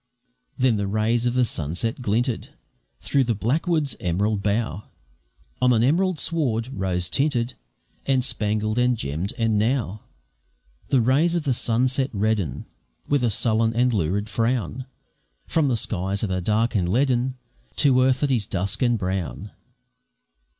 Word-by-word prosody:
Then 125 -4 +3
the 100 -1 -1
rays 110 +4 +1
of 120 - -1
the 125 -1 +4
sunset 90 - -3
glinted 120 +2 -1 0.5
Through 140 - +2
the 115 -1 0
blackwoods' 150 - 0
emerald 100 +4 0
bough 105 0 -1 0.8
On 125 - +5
an 115 -2 +3
emerald 175 +7 +2
sward, 130 -9 -1
rose 90 -6 -1
tinted, 130 -1 0 0.5
And 130 -2 +2
spangled, 110 -2 0
and 125 -1 +2
gemm'd; 80 +3 -3
and 110 -2 +1
now 110 -3 0 0.9
The 130 - +3
rays 145 +9 +3
of 170 - 0
the 140 -3 +1
sunset 130 +3 0
redden 105 -6 -1 0.4
With 145 -3 +1
a 120 - +3
sullen 115 +1 +1
and 125 +1 +2
lurid 100 +2 0
frown, 120 +3 -1 0.6
From 160 -3 +1
the 125 -3 +1
skies 95 -1 -2
that 105 - -1
are 90 0 -1
dark 110 +5 +1
and 90 -6 +1
leaden, 130 +1 +1 0.4
To 130 -3 +4
earth 130 0 +2
that 145 -2 +1
is 115 -6 0
dusk 95 +5 -2
and 120 -2 +3
brown. 95 -4 -3
115 Hz, 150 wpm, -24 LUFS, 105-130 Hz, 0.9 s, On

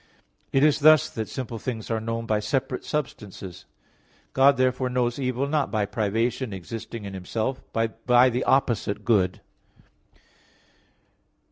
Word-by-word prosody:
It 135 - +3
is 150 0 +4
thus 155 -1 +6
that 110 -2 -4
simple 120 -3 -5
things 115 -2 -5
are 110 - 0
known 115 +1 -3
by 110 -2 +1
separate 130 +3 -2
substances. 105 - -5 0.7
God 140 +1 +5
therefore 130 0 +1
knows 125 0 0
evil, 130 0 -1
not 145 -2 0
by 105 -1 0
privation 110 +3 -1
existing 110 +3 -7
in 100 - -6
Himself, 110 +7 -3
but 115 0 -2
by 125 +1 +6
the 125 +2 -1
opposite 115 -6 +1
good. 95 -6 +2
120 Hz, 135 wpm, -25 LUFS, 110-130 Hz, 0.7 s, thus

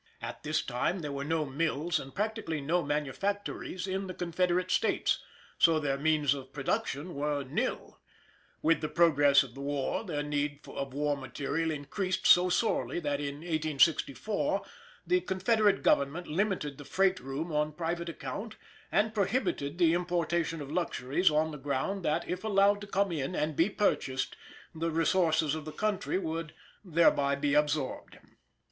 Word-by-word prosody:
At - - -7
this 155 0 0
time 135 +9 -1
there 150 -2 -4
were 140 0 -3
no 160 +1 0
mills, 155 +3 0
and 135 - -10
practically 210 -6 -2
no 165 +6 +1
manufactories 180 +6 -2
in 190 0 -3
the 185 - -6
Confederate 180 +1 0
States, - - +1 0.4
so 165 -2 +5
their 140 -2 -1
means 150 -2 +3
of 135 -2 -8
production 145 +3 -2
were 145 0 -1
nil. 130 - -3 0.6
With 165 +1 +3
the 155 - -2
progress 145 -5 +5
of 125 -3 -11
the 135 - -9
war 140 +6 -1
their 150 -8 -3
need 145 0 -2
of 135 -1 -5
war 145 0 +1
material 140 +4 -2
increased 160 +6 -2
so 180 +1 +7
sorely 215 -2 0
that 145 -3 -1
in 145 0 -4
1864 160 - +1 0.4
the 360 0 +2
Confederate 205 - +2
Government 145 +6 +2
limited 160 -5 -1
the - - -7
freight 190 +4 +2
room 140 +6 -4
on 150 0 +1
private 170 +2 -3
account, 215 +5 -6 0.4
and 215 +2 +2
prohibited 195 - 0
the 170 -2 +4
importation 170 -2 0
of 140 - -9
luxuries 170 -1 +1
on 155 +1 +1
the 150 - -8
ground 145 +8 -2
that 160 +2 0
if 180 +2 -3
allowed 205 -1 +3
to 205 - -7
come 200 -1 +1
in 155 +1 -2
and 155 0 -1
be 165 +7 +3
purchased 135 -10 0 0.4
the 165 +1 -2
resources 160 -2 +2
of 155 -1 -4
the 155 - -7
country 210 +1 -1
would 160 -3 -4 0.3
thereby 155 -5 +3
be 140 0 0
absorbed. 150 -2 0
160 Hz, 160 wpm, -30 LUFS, 145-185 Hz, 0.6 s, so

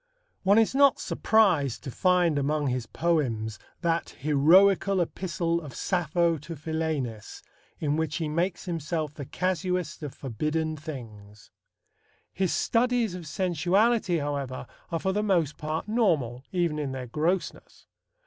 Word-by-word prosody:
One 200 +2 +4
is 225 +1 +4
not 280 0 +5
surprised 180 - +2
to 135 - -5
find 175 -2 +2
among 145 0 0
his 125 -2 -2
poems 120 -10 -1 0.2
that 170 -1 -1
"heroical 185 +7 +4
epistle 170 -1 -1
of 145 -5 -9
Sappho 170 -2 +1
to 160 +4 -8
Philaenis," 150 -8 -4 0.4
in 150 -1 0
which 160 -2 -1
he 165 -3 -2
makes 170 +5 -1
himself 160 -3 -3
the 145 -2 -7
casuist 180 -1 -2
of 145 -3 -6
forbidden 155 +5 -2
things. 110 -9 -10 0.8
His 190 -2 0
studies 240 -3 +1
of 175 -3 -7
sensuality, 185 +4 +2
however, 140 -4 -3 0.2
are 165 - -1
for 190 +3 -1
the 210 - +1
most 175 -8 +1
part 155 +4 -3
normal, 155 - +1
even 170 -4 0
in 140 -3 -3
their 130 -1 -5
grossness. 165 +9 -2
160 Hz, 135 wpm, -27 LUFS, 145-185 Hz, 0.8 s, not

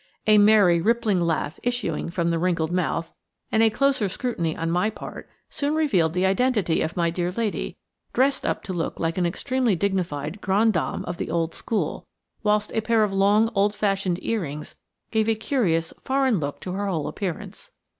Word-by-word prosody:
A 215 -1 +6
merry, 205 -5 +5
rippling 225 -1 +2
laugh 160 -3 -1
issuing 240 -11 -2
from 170 -1 -1
the 165 -1 0
wrinkled 170 -2 0
mouth, 170 -2 -1 0.4
and 220 - +3
a 225 - +6
closer 265 -3 +1
scrutiny 180 -7 -2
on 165 0 -1
my 180 +5 +2
part, 220 - -9 0.2
soon 290 +2 -2
revealed 190 - +2
the 180 +1 +1
identity 195 -3 +2
of 160 - -3
my 170 -1 +2
dear 175 +1 -1
lady, 220 +1 -3 0.3
dressed 270 +2 +2
up - - -1
to 190 - -5
look 170 -2 -3
like 165 +2 -1
an 175 - +2
extremely 255 +4 0
dignified 175 -3 -2
grande 210 +4 +3
dame 170 - -2
of 175 - -5
the - - -4
old 165 0 -1
school, 225 - -3 0.3
whilst 210 -1 +1
a 220 - +1
pair 220 0 +2
of 205 -2 0
long, 205 +3 +3
old 205 +1 +2
fashioned 195 -4 0
earrings 155 -10 -3 0.4
gave 220 -1 +2
a 225 - +3
curious, 195 - 0
foreign 265 -6 +1
look 145 -1 -4
to 185 - -5
her 200 +2 -2
whole 165 -6 -1
appearance. 185 -5 -5
195 Hz, 185 wpm, -24 LUFS, 170-220 Hz, 0.4 s, A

